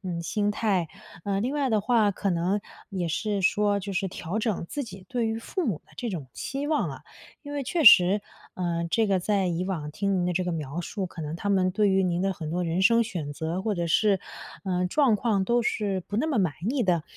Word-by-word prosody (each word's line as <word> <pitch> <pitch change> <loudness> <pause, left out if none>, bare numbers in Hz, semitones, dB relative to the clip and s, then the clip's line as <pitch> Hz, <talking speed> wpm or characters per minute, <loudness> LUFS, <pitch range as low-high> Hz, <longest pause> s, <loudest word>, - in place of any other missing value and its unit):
嗯， 170 -2 -3
心 205 +5 0
态。 195 -6 +1 0.4
呃， 195 -1 0
另 245 +6 -1
外 285 -3 0
的 215 -3 +2
话， 215 -2 +3
可 195 +1 -1
能 180 +4 0 0.3
也 185 -5 -2
是 200 +4 -1
说 205 +1 +2
就 200 +1 -5
是 190 +1 0
调 180 +2 -4
整 215 -6 -1
自 285 - -3
己 195 -5 -11
对 240 -2 0
于 220 0 -1
父 350 +8 -3
母 195 -10 -2
的 - - -26
这 245 - -3
种 165 - -5
期 280 +2 -4
望 310 - +1
啊。 - - -7 0.4
因 290 - -8
为 285 -1 -2
确 330 +6 0
实， 200 -5 +8 0.3
呃， 170 -2 -1
这 225 -2 +3
个 195 -2 +3
在 195 0 +1
以 175 +1 -1
往 165 -6 -3
听 200 +5 -1
您 180 -2 +1
的 180 - 0
这 180 +1 0
个 180 - -1
描 155 0 -4
述， 195 +2 -4
可 175 -2 -7
能 150 0 -4
他 190 +4 -4
们 190 -2 +3
对 205 +1 +3
于 190 0 +3
您 175 0 0
的 195 0 +1
很 160 -4 -6
多 175 +3 -1
人 170 +2 0
生 230 +4 +5
选 170 -10 -4
择， 160 +5 -3
或 210 +1 -1
者 170 -1 -2
是， 195 +3 +3 0.4
呃， 180 -2 0
状 250 +2 +3
况 205 -2 +1
都 240 +4 +2
是 200 -4 -1
不 205 - -4
那 305 +8 +1
么 280 -7 +1
满 180 -7 +2 0.2
意 260 -3 0
的。 175 -4 +2
195 Hz, 260 characters per minute, -26 LUFS, 175-220 Hz, 0.4 s, 实